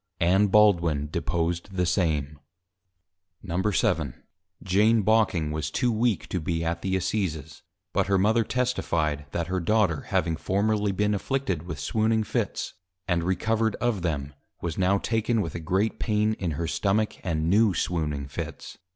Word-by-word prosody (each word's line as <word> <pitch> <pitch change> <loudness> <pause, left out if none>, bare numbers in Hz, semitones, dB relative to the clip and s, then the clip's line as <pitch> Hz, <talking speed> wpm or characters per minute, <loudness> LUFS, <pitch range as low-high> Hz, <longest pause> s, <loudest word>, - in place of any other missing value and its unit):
Ann 95 +4 +4
Baldwin 85 -8 +3
deposed 85 +4 -2
the 90 -1 +1
same. 75 -5 0 1.0
VII. 90 -6 0 0.5
Jane 105 +4 +3
Bocking, 95 -8 +2
was 75 -2 -2
too 120 +9 +1
weak 110 -2 0
to 90 - -1
be 85 0 -2
at 85 0 -2
the 95 0 -1
Assizes. 85 -5 -2 0.3
But - - +1
her 100 0 +3
Mother 110 +4 +3
Testifi'd, 85 - -1
that 85 - -1
her 95 +2 -1
Daughter 90 -4 +2
having 80 -1 0
formerly 105 +1 0
been 105 +2 +1
Afflicted 100 - -2
with 80 -4 -5
Swooning 110 0 +1
Fits, - - -2 0.3
and 85 -3 +1
Recovered 110 +4 0
of 120 -5 -1
them; 75 -4 -2 0.3
was 85 -3 -3
now 95 +1 +2
taken 115 +2 0
with 85 -7 -2
a 85 - -4
great 95 +7 0
Pain 105 -1 +1
in 85 -4 -1
her 85 +3 -2
Stomach; 105 +5 0
and 80 -3 -1
New 100 +1 +4
Swooning 75 -5 -1
Fits. 70 - -7
95 Hz, 150 wpm, -26 LUFS, 80-105 Hz, 1.0 s, Ann